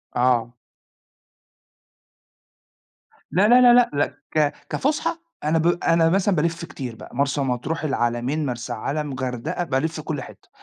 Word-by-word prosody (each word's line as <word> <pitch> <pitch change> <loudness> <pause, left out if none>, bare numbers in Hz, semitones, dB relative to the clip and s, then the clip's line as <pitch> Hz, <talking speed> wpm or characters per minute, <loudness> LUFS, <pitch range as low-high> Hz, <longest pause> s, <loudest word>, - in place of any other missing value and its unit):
آه. 120 -1 +2 2.8
لا 190 +6 +4
لا 245 +1 +7
لأ 245 0 +5
لأ 145 0 +2 0.3
ك 150 -2 +2 0.2
كفسحة 310 +4 -1 0.2
أنا 155 +2 +2
ب 165 +1 +2 0.2
أنا 165 -1 +4
مثلًا 195 +1 +2
بالف 165 +1 -1
كتير 125 -8 -7
بقى، 115 - -12
مرسى 140 +1 0
مطروح، 135 +5 -2
العلمين، 130 +1 -1
مرسى 120 -2 -4
علم، 140 +5 -3
غردقة، 130 +5 -3
بالف 160 +1 -1
كل 150 -2 -4
حِتّة، - - -13
150 Hz, 130 wpm, -23 LUFS, 125-165 Hz, 2.8 s, لا